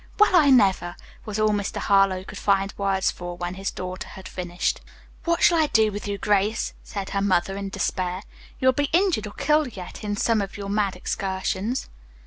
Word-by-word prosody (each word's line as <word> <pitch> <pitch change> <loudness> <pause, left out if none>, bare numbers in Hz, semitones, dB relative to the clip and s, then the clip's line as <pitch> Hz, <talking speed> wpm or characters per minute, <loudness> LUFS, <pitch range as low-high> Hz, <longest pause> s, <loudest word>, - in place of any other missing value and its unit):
"Well, 420 -3 +5
I 305 -5 +6
never!" 195 -8 +4 0.3
was 215 -1 -4
all 215 0 +3
Mr. 205 -1 -2
Harlowe 195 -2 +3
could - - -9
find 195 -1 +1
words 195 -1 +1
for 175 0 -7
when 175 0 -3
his 195 +1 -3
daughter 185 0 -6
had 190 - -10
finished. 175 -1 -2 0.4
"What 335 0 +1
shall 340 -1 +6
I 310 - +3
do 220 -5 +3
with 205 +1 -6
you, 200 0 -2
Grace?" 210 +2 +1
said 200 -2 -6
her 200 - 0
mother 195 -1 +1
in 200 0 -4
despair. 185 -1 -2 0.4
"You 260 - +4
will - - +4
be 285 +1 0
injured 345 - +2
or 205 - -9
killed 300 -7 +1
yet, 180 +3 -8
in 205 -1 -2
some 225 -1 +2
of 195 0 -5
your 200 -1 -5
mad 200 -2 0
excursions." 190 +5 -2
200 Hz, 200 wpm, -24 LUFS, 190-220 Hz, 0.4 s, I